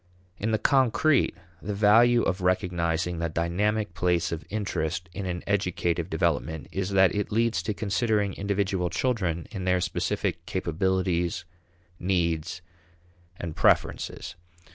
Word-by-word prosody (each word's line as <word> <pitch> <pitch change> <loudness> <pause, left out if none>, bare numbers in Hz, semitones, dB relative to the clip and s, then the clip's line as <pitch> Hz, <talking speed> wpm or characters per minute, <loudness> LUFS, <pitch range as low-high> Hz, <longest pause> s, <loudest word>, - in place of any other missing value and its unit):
In 110 - -1
the 110 - +2
concrete, 135 +4 +3 0.3
the 105 +2 -3
value 115 +4 +5
of 95 +1 -1
recognizing 90 -2 0
the 85 0 -1
dynamic 90 +5 0
place 85 -1 +1
of 85 -1 -4
interest 95 -4 -2
in 100 -2 -4
an 90 -1 -3
educative 90 -4 0
development 80 0 -1
is 95 0 -2
that 95 -2 +4
it 105 -1 -2
leads 115 -3 +1
to 105 +4 -2
considering 105 -1 0
individual 100 -3 -1
children 85 -4 -1
in 95 -4 -5
their 90 0 +3
specific 85 -1 -2
capabilities, 90 -1 0 0.5
needs, 85 -2 -1 0.8
and 85 -2 -5
preferences. - - +1
95 Hz, 125 wpm, -27 LUFS, 85-105 Hz, 0.8 s, value